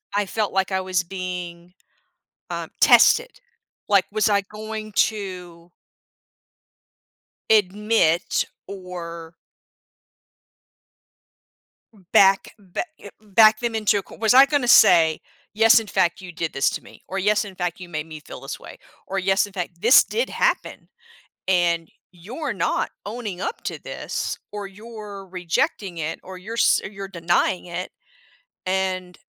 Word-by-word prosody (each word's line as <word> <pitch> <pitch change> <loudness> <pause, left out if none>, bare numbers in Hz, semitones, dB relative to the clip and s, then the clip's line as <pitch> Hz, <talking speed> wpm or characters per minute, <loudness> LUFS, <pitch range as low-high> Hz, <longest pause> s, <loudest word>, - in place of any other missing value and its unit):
I 205 0 +1
felt 210 0 -2
like 190 0 0
I 190 - +1
was 185 -1 0
being, 180 -1 -6 0.8
um, - - -5
tested. - - +5 0.5
Like, 200 -2 +4
was 215 0 +2
I 200 -1 +3
going 215 +1 -7
to 180 -5 -2 1.8
admit 205 -4 +2 0.2
or 170 -3 -8 2.8
back 195 0 +5
ba 195 - -5 0.2
eh, - - -10
back 215 +1 +5
them 235 -2 -2
into 210 -2 +2
a - - -4
co - - -14
Was 225 +2 +2
I 270 +1 +9
gonna 275 -4 0
say, 170 -8 +6 0.3
"Yes, 225 +1 +6
in 225 - -8
fact, 185 -3 0
you 180 -1 -9
did 165 -2 -3
this 135 - +2
to - - -6
me," - - -16
or, 195 - -3
"Yes, 210 +2 +2
in 195 -2 -10
fact, 180 0 -3
you 180 - -9
made 155 -1 -4
me 155 -1 -9
feel - - -11
this - - -7
way," - - -12 0.3
or, 195 - -3
"Yes, 195 +2 +2
in 200 - -15
fact, 175 -2 -5
this 235 +7 +7
did 475 +2 -2
happen, - - -1 0.6
and 170 -3 +2 0.2
you're 235 - -5
not 185 -4 -1 0.2
owning 210 -5 -5
up - - -4
to - - -4
this, - - -4
or 205 -1 -5
you're 205 -1 -10
rejecting 180 0 -2
it, 160 +1 -3
or 185 0 -10
you're 215 +5 -8
s - - +4
or - - -4
you're 195 -1 -7
denying 175 0 0
it," 175 +1 -5 0.7
and, 185 -1 -2
190 Hz, 145 wpm, -23 LUFS, 175-215 Hz, 2.8 s, I